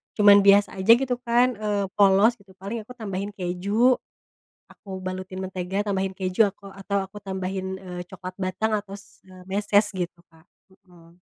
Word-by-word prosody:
cuman 205 -1 +7
biasa 200 +1 +5
aja 190 +4 +5
gitu 250 -1 -2
kan, 245 +1 +3
eee, 205 -2 -1
polos 205 +3 +5
gitu 200 -1 -20
paling 200 +5 -5
aku 250 +4 -13
tambahin 200 -3 -4
keju, 200 +7 +1 0.8
aku 200 - -15
balutin 185 0 -5
mentega, 190 +1 -3
tambahin 195 -1 -1
keju, 185 +3 +2
aku 200 0 -14
atau 195 0 -2
aku 195 +2 -11
tambahin, 190 -1 -4
eee, 180 -2 -7
coklat 185 0 -9
batang 185 +4 -1
atau 200 -1 -9
s 200 - -14
eee, 185 -1 -14
meses 205 +1 +2
gitu, 175 -2 -5
Kak 160 0 -23 0.4
mhm. 175 0 -20
195 Hz, 165 wpm, -24 LUFS, 185-205 Hz, 0.8 s, cuman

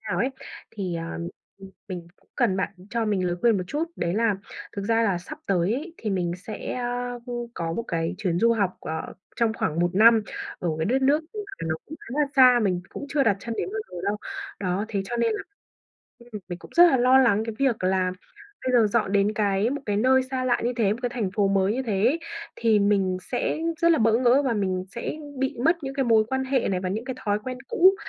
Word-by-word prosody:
nào - - 0
ấy. 255 - +1 0.4
Thì, 190 -5 -4
à, 165 0 -5 0.4
ừm, 195 -1 -11 0.2
mình 175 -3 -6 0.3
cần 190 - +2
bạn 195 - 0 0.2
cho 235 -1 0
mình 200 -4 0
lời 175 0 -1
khuyên 235 -3 +4
một 185 - -2
chút 295 - -1
đấy 170 +1 -1
là 225 -1 +2 0.4
thực 200 - -2
ra 225 +3 +2
là 200 -6 +1
sắp 175 - -9
tới 190 +2 +2
ấy, 325 +6 -5
thì 215 - -3
mình 180 -3 0
sẽ, 200 +4 -6
a, 245 0 -2
ưm, 240 -1 -4
có 165 -1 -3
một 230 - -2
cái 165 +1 -1
chuyến 180 -5 0
du 230 +4 +4
học, 200 -5 0
ờ, 160 0 -5 0.2
trong 230 -2 +2
khoảng 160 -6 -1
1 175 +1 +1
năm 225 +2 +6 0.4
ở 175 - -2
cái 160 - 0
đất 265 +4 +1
nước 285 +3 +4
mà 425 - -3 0.3
nó 160 - 0
cũng 315 - -8
khá - - -14
là 295 - +3
xa, 250 -2 +7
mình 180 -4 0
cũng 285 - -7
chưa 280 0 +2
đặt 205 -7 +3
chân 230 +2 -4
đến - - -1
bao 435 - -2
giờ - - -8
đâu. 200 +1 0 0.4
Đó, 190 +1 -1
thế 200 -3 -1
cho 240 +5 -4
nên 235 -1 +2
là, 215 - -3 0.8
ừm, 235 -3 -9
mình 175 -1 -5
cũng - - -14
rất 345 - +10
là 265 - +4
lo 255 +1 +5
lắng 225 -5 +4
cái 225 - -4
việc 260 -8 +1
là 185 0 +2 0.5
bây 255 - 0
giờ 220 - +4
dọn 210 -2 0
đến 205 +1 +2
cái 205 +1 +1
một 285 +1 -3
cái 205 -1 0
nơi 260 +4 +4
xa 260 0 -3
lạ 245 -1 +2
như 240 - +1
thế, 210 -4 +2
một 220 - -4
cái 245 - +1
thành 230 -6 -2
phố 205 -2 +2
mới 195 0 +2
như 260 - -1
thế 205 -5 0
ấy 305 +7 +2 0.4
thì 225 -2 +3
mình 200 -2 +2
sẽ 250 +7 -2 0.2
rất 335 - +5
là - - +3
bỡ 225 0 +4
ngỡ 255 +2 +4
và 265 -4 +1
mình 185 -3 -1
sẽ 235 - -3 0.3
bị 265 0 -1
mất 330 +3 +5
những 270 -1 -4
cái 270 -1 +1
mối 225 -2 +4
quan 265 +1 -1
hệ 265 -1 +1
này 185 -2 0
và 185 - -2
những 215 +5 -3
cái 260 0 -4
thói 205 -1 +1
quen 255 -1 -4
cũ 375 +3 +5
220 Hz, 250 wpm, -25 LUFS, 195-250 Hz, 0.8 s, rất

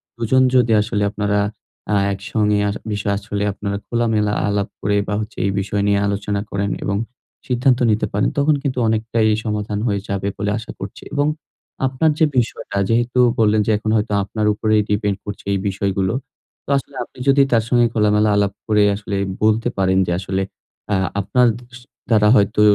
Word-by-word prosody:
২ 120 - -15
জন 130 0 +5
যদি 120 -2 +4
আসলে 105 -1 -1
আপনারা 105 -1 0 0.5
আ - - +3 0.2
একসঙ্গে 105 +2 0
আ - - +1 0.2
বিষয় 105 -1 -1
আসলে 100 -1 -3
আপনারা 100 0 -3
খোলামেলা 110 -3 +1
আলাপ 100 -1 0
করে 100 +1 +1
বা - - -2
হচ্ছে 110 +1 -8
এই 100 - +1
বিষয় 100 +1 -1
নিয়ে 100 -1 +3
আলোচনা 100 0 -2
করেন 100 0 -1
এবং 100 - 0 0.5
সিদ্ধান্ত 125 0 +2
নিতে 105 - +1
পারেন 100 +1 +1
তখন 145 +1 +3
কিন্তু 135 -3 -2
অনেকটাই 110 0 +1 0.2
সমাধান 105 -1 -2
হয়ে 100 -3 0
যাবে 100 0 -2
বলে 100 +1 -1
আশা 110 - -7
করছি। - - -8
এবং 145 +1 +1 0.6
আপনার 130 +5 +1
যে 160 - +6
বিষয়টা 115 -4 -1
যেহেতু 120 +2 +1 0.2
বললেন 110 -1 +4
যে - - +3
এখন 110 +1 -4
হয়তো 105 0 -1
আপনার 105 +2 -3
উপরেই 110 0 +2
depend 105 -1 0
করছে 100 0 -7
এই 100 - 0
বিষয়গুলো। 95 0 -1 0.5
তো - - -12
আসলে 135 0 -7
আপনি 120 - -16
যদি 140 0 +5
তার 115 -2 +3
সঙ্গে 120 -1 +4
খোলামেলা 105 0 +3
আলাপ 100 -1 +1
করে 105 -1 +4
আসলে 100 0 -5 0.3
বলতে 110 +2 +3
পারেন 95 -1 +2
যে - - 0
আসলে 95 0 -2 0.5
আ - - +3 0.3
আপনার 120 +6 +3
দ - - -16 0.2
স - - -13 0.3
দ্বারা 105 -2 +4
হয়তো 105 +1 +3
105 Hz, 180 wpm, -20 LUFS, 100-115 Hz, 0.6 s, যে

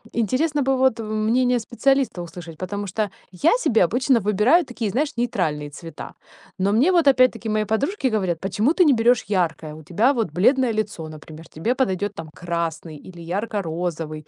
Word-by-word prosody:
интересно 275 - 0
бы 270 0 +1
вот 260 -3 +2
мнение 225 +3 +1
специалиста 260 -2 0
услышать, 170 -1 -9
потому 200 +3 -4
что 210 +2 -2 0.2
я 305 - +2
себе 225 - +3
обычно 245 +6 +2
выбираю 210 - +3
такие, 240 -4 -4
знаешь, 285 +3 -1
нейтральные 160 -11 -1
цвета. 165 +2 -9 0.5
Но 195 +2 +1
мне 265 - +4
вот 340 -5 +3
опять-таки 255 -4 +3
мои 215 0 0
подружки 265 - -1
говорят: 190 -7 -1
"Почему 205 - 0
ты 360 0 +4
не 290 - +5
берешь 240 0 +3
яркое? 165 -6 -1
У 155 +1 -12
тебя 205 - +2
вот 225 - -2
бледное 245 - +2
лицо, 205 -7 -3
например, 155 +1 -12
тебе 225 +11 -2
подойдет 205 -6 -1
там 160 -1 -8
красный 170 -2 -4
или 175 +3 -13
ярко-розовый, 165 -5 -4
215 Hz, 170 wpm, -22 LUFS, 170-250 Hz, 0.5 s, не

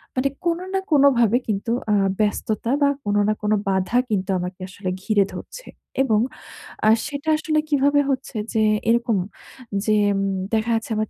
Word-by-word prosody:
মানে 265 +2 +1 0.2
কোনো 340 +1 0
না 385 - +2
কোনোভাবে 250 -6 +5
কিন্তু 215 +1 -2 0.2
আ - - +4 0.3
ব্যস্ততা 215 +2 -1
বা, 280 - +5 0.2
কোনো 205 0 +1
না - - +3
কোনো 210 0 +2
বাধা 190 +5 +1
কিন্তু 195 -2 -1
আমাকে 180 +1 -5
আসলে 185 0 -5
ঘিরে 205 -2 +3
ধরছে - - -9 0.4
এবং 220 -5 +2 0.7
আ - - +7 0.2
সেটা 285 +2 -4
আসলে 310 -1 0
কিভাবে 285 0 +3
হচ্ছে? 265 -1 -3 0.2
যে 220 - +2 0.3
এরকম 235 -2 +2 0.7
যে 215 -1 +3 0.2
উম 195 - 0 0.3
দেখা 220 +1 +1
যাচ্ছে 225 +1 -3
আমার 215 0 -1
225 Hz, 160 wpm, -22 LUFS, 210-280 Hz, 0.7 s, আ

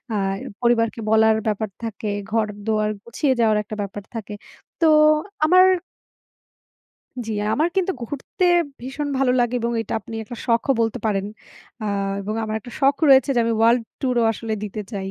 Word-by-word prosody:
আর 195 -1 -1 0.2
পরিবারকে 230 -1 +2
বলার 220 0 +5
ব্যাপার 215 0 -1
থাকে, 215 -2 -4 0.2
ঘর-দুয়ার 215 -1 0
গুছিয়ে 260 +4 0
যাওয়ার 220 -2 +3
একটা 210 +1 -7
ব্যাপার 200 0 -6
থাকে। 210 -2 -6 0.5
তো 325 - +5 0.6
আমার 365 +3 +6 1.6
জি, 225 - -3 0.2
আমার 315 +3 +2
কিন্তু 380 0 +1
ঘুরতে 280 +8 -3 0.4
ভীষণ 270 +4 -4
ভালো 265 -2 +3
লাগে 240 0 +1
এবং 235 +1 -1
এটা 225 - -5
আপনি 225 - -10
একটা 240 +3 -9
শখও 235 +3 +2
বলতে 225 +2 0
পারেন। 195 -2 0 0.6
আ - - -3 0.4
এবং 210 +2 -4
আমার 215 0 -3
একটা 245 +2 -12
শখ 275 0 +4
রয়েছে 270 +1 +6
যে 240 - +3
আমি 230 - +1
ওয়ার্লড 230 +2 +4 0.2
ট্যুরও 250 -3 +1
আসলে 225 0 -4
দিতে 210 +1 -5
চাই। 195 -2 -4
225 Hz, 160 wpm, -22 LUFS, 215-250 Hz, 1.6 s, আমার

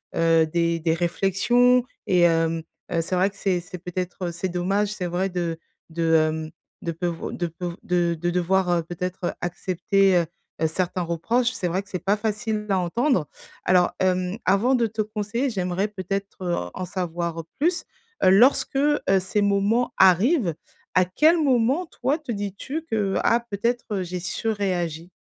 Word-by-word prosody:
heu, 165 -1 +4
des 170 +1 0
des 160 0 +1
réflexions 200 +9 +3 0.2
et 180 -2 +3
hem, 165 -1 +2 0.3
heu, 165 - +1
c'est 180 +3 -2
vrai 190 +2 +3
que 200 - -21
c'est 190 -3 0
c'est 180 +1 -9
peut-être 180 0 -4
c'est 180 +2 -3
dommage, 195 +4 0
c'est 190 -4 -4
vrai 185 +3 -1
de 170 -2 -2 0.3
de, 165 0 0
hem, 155 0 +1 0.3
de 170 - -2
peuvo 165 0 -3
de 175 - -2
peuv 170 +1 -6
de 175 -1 +1
de 175 +1 0
devoir, 180 +1 +1
heu, 170 -1 +2
peut-être 175 +2 -4
accepter, 185 +2 +1
heu 170 - +2 0.4
heu, 160 - +3
certains 180 +2 -2
reproches, 230 +9 0
c'est 190 -8 -3
vrai 185 +3 -1
que 200 - -23
c'est 185 - -2
pas 200 +2 +3
facile 215 0 -2
à 195 - +2
entendre. 180 - +1 0.4
Alors, 180 -1 +4
hem, 185 +1 0
avant 205 +8 +3
de 235 -2 +2
te 220 0 -2
conseiller, 215 +5 -2
j'aimerais 190 -1 -1
peut-être, 195 0 -5
heu, 175 -1 0 0.2
en 185 - -3
savoir 170 -3 -3 0.2
plus. 340 +4 +1 0.4
Lorsque, 225 +10 +5
heu, 295 +1 +3 0.2
ces 190 +3 -1
moments 205 +5 +2
arrivent, 190 - +4 0.4
à 185 0 +5
quel 310 - +4
moment, 275 +3 +2
toi, 275 +4 -1
te 285 -6 -6
dis-tu 205 - -4
que: 210 -8 -1
«Ah, 235 +1 +3
peut-être 210 -1 -1
j'ai 180 0 -4
surréagi»? 180 -4 -2
185 Hz, 165 wpm, -24 LUFS, 175-215 Hz, 0.4 s, Lorsque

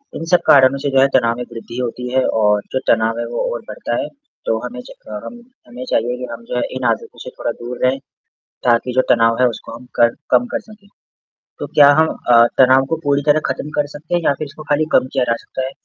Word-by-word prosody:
इन 165 - -5
सब 180 - +7
कारणों 135 0 +6
से - - +2
जो 135 - +2
है 135 - +5
तनाव 115 -1 +1
में 125 - -4
वृद्धि 115 +1 -9
होती 125 0 -4
है 130 0 +3 0.2
और 105 0 +3
जो 130 - +1
तनाव 115 0 +1
है 120 - -2
वो - - -3
और - - -5
बढ़ता - - -4
है, 295 - -4 0.4
तो - - +1
हमें - - -7
च - - -14 0.2
क - - -6
हम 240 - -9 0.3
हमें 125 +1 -8
चाहिए 120 +2 0
कि 125 - -5
हम 115 0 -8
जो 125 - -5
है - - +1
इन 130 - -5
आदतों 115 - -6
से - - -8
थोड़ा - - -1
दूर 120 +1 -6
रहें 130 +1 +2 0.7
ताकि 120 +1 +2
जो 130 +1 +3
तनाव 115 0 +4
है 125 - +5
उसको 115 - -8
हम 120 - -13 0.2
कर 120 0 +4 0.2
कम 245 - +3
कर 285 - 0
सकें 215 -2 -18 0.7
तो - - -4
क्या 145 -1 +6
हम 160 - +4 0.2
अ, 115 0 +7
तनाव 130 +1 +5
को 165 - +1
पूरी 145 0 +1
तरह 150 +1 +5
ख़त्म 135 +2 -4
कर 145 - 0
सकते 160 +4 -4
हैं 175 - 0
या - - +4
फिर 155 - -3
इसको 155 +2 -11
खाली 150 +1 +2
कम 130 - +3
किया 130 - +1
जा - - +2
सकता 130 - -4
है, 130 - -5
130 Hz, 255 wpm, -18 LUFS, 120-145 Hz, 0.7 s, सब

